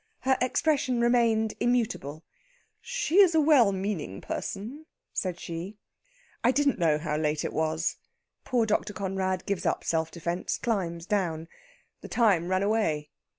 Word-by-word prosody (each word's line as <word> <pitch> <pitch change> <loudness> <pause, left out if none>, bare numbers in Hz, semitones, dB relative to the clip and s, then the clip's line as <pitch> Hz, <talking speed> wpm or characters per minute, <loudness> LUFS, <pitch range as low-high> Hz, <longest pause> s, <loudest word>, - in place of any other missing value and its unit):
Her 265 +2 +3
expression 255 -1 +1
remained 230 -2 +3
immutable. 220 - -1 0.6
"She 445 -7 0
is 365 -5 +6
a - - +6
well 285 -9 +5
meaning 190 - -3
person," 250 +11 -5 0.3
said 180 -2 -2
she. 175 +5 -6 0.7
"I 240 - +5
didn't 280 -1 +1
know 160 -3 +3
how 150 -1 -2
late 150 -1 0
it - - -3
was." 160 +1 -1 0.5
Poor 245 -3 +1
Dr. 210 -1 0
Conrad 190 -1 -2
gives 200 -2 -2
up - - 0
self 160 -1 0
defence 170 +1 -3
climbs 175 -8 -2
down. 175 -6 -1 0.5
"The - - -8
time 200 -8 +3
ran 185 +1 +1
away." 165 -9 0
200 Hz, 145 wpm, -28 LUFS, 165-240 Hz, 0.7 s, is